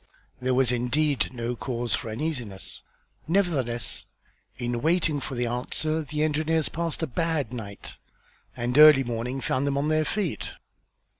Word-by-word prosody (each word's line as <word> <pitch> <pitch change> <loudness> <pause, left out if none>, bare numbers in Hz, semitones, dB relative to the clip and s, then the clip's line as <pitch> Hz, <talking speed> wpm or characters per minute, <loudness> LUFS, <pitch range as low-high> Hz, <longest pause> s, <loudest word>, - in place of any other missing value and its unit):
There 130 0 +1
was 130 -2 +4
indeed 135 +4 +1
no 120 -1 -3
cause 120 -1 -3
for 115 - -1
uneasiness; 115 - -4 0.5
nevertheless, 140 - 0 0.5
in 120 -1 -2
waiting 160 -2 +2
for 130 0 -5
an 120 0 0
answer 140 +6 -1
the 150 0 -2
engineers 155 +1 +1
passed 165 0 -3
a - - +3
bad 150 -3 -1
night, 100 -5 -7 0.6
and 120 +1 -1
early 150 -3 +9
morning 120 +2 -3
found 130 +2 0
them 140 0 0
on 145 +2 +1
their 155 0 +3
feet. 195 -2 -2
135 Hz, 145 wpm, -26 LUFS, 120-155 Hz, 0.6 s, early